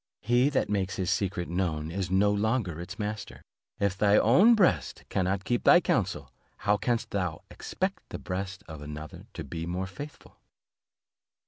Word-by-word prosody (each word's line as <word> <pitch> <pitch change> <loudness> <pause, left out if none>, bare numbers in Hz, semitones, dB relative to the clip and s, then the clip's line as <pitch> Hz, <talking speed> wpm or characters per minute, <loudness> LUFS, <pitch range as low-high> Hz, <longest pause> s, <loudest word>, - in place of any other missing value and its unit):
He 120 +5 +3
that 140 - +1
makes 100 -2 -1
his 95 0 -1
secret 95 -2 -1
known 85 -3 -2
it 95 0 -2
no 100 +2 +3
longer 105 -5 0
its 90 +1 -8
master. 105 0 -5 0.4
If 100 -2 +1
thy 100 +1 +4
own 190 - +6
breast 90 - +1
cannot 95 +1 0
keep 120 +3 0
thy - - +8
counsel, - - -1 0.2
how 105 +1 +2
canst 115 +2 -1
thou 90 -5 -2
expect - - -4
the - - -5
breast 95 +1 -5
of 80 -3 -9
another 75 +1 -8
to - - -5
be 80 +4 -5
more 90 +2 -2
faithful?'" 145 +10 -10
95 Hz, 160 wpm, -28 LUFS, 90-105 Hz, 0.4 s, thy